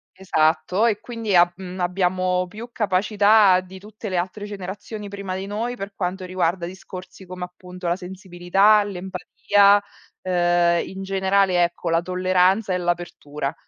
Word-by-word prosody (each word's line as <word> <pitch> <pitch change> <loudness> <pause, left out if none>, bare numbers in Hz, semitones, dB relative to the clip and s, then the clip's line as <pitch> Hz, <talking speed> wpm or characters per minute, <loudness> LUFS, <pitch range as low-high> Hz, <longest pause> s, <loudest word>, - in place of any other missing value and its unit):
Esatto. 175 +2 +1
E 215 -3 +1
quindi 225 -4 -3
a 175 0 +6
mhmm, 185 0 -8
abbiamo 180 0 0
più 220 +6 -9
capacità 205 -1 +4
di 185 +1 -12
tutte 215 +2 -9
le 185 - -1
altre 190 +4 -3
generazioni 205 +1 -7
prima 200 -2 -5
di 190 +1 -4
noi 225 +5 -3
per 200 -3 -7
quanto 185 0 -3
riguarda 180 -1 -1
discorsi 185 +1 -10
come 180 0 -6
appunto 180 0 -9
la 170 - +1
sensibilità, 190 +3 +2
l'empatia, 200 +2 +2 0.4
ehm, 175 -1 +2
in 190 0 -7
generale 190 -1 +2
ecco 175 0 -2
la 165 +1 +2
tolleranza 185 +3 +1
e - - +1
l'apertura. 175 -5 -3
185 Hz, 145 wpm, -22 LUFS, 180-200 Hz, 0.4 s, a